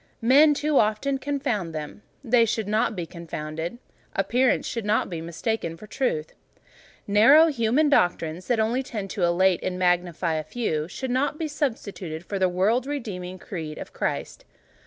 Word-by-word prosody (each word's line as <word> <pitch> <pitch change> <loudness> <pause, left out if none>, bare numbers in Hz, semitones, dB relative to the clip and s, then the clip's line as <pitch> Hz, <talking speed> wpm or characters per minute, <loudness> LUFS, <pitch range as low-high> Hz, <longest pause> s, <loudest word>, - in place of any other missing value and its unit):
Men 290 +5 +6
too 295 0 +2
often 220 +6 +1
confound 255 - -2
them: 150 +6 -6 0.2
they 240 -2 +4
should 220 -2 -1
not 215 +1 +1
be 175 -3 -3
confounded: 165 +2 -6 0.4
appearance 245 +7 +2
should 230 - -3
not 210 -1 +1
be 165 -2 -4
mistaken 170 +1 -3
for 215 - -11
truth; 205 - -2 0.7
narrow 270 +11 +6
human 260 +2 +2
doctrines, 175 - +1
that 240 -2 +1
only 230 +4 +1
tend 210 -7 -5
to 205 - -4
elate 175 +1 +3
and 180 -1 -3
magnify 180 -2 +1
a 155 0 -1
few, 155 -8 -2
should 260 +8 -5
not 275 +4 0
be 320 - -2
substituted 200 - -4
for 200 +1 -3
the 185 -1 +3
world 215 +8 +1
redeeming 190 -10 -5
creed 160 -4 -6
of - - -8
Christ. - - -3
210 Hz, 160 wpm, -25 LUFS, 175-255 Hz, 0.7 s, Men